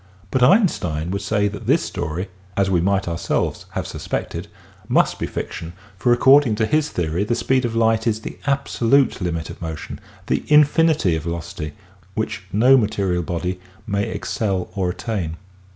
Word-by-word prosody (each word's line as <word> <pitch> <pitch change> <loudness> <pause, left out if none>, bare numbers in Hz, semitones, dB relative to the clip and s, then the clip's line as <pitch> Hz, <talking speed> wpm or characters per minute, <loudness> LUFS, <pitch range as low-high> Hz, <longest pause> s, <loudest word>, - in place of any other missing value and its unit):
But 130 - +1
Einstein 90 - +3
would 100 +1 -2
say 105 0 +1
that 100 0 -6
this - - +3
story 90 +6 -4
— 95 0 -27
as 95 -1 +2
we 90 -2 +3
might 100 +1 +1
ourselves 85 0 -1
have - - -2
suspected - - -4 0.2
— - - -26
^must - - +2
be - - -2
fic - - -5
tion 80 +1 -7 0.2
for 120 +6 +1
according 130 -1 +5
to 110 +1 +1
his 150 +4 +1
theory 85 +2 -1
the 115 +3 0
speed 130 +1 +1
of 115 -1 -2
light 115 0 +2
is 110 -1 0
the - - -8
absolute 140 -2 +2
limit 85 -2 -2
of - - -12
motion, 80 -2 -6 0.3
the - - 0
infinity 150 - +4
of 80 - -2
velocity, 80 -2 -5 0.4
which' 105 -3 -3
no 125 +6 +6
material 100 -6 0
body 90 +2 -3 0.3
may 100 -2 -1
excel 95 -5 -2
or 95 -3 0
attain. 90 -4 -3
100 Hz, 175 wpm, -21 LUFS, 90-120 Hz, 0.4 s, no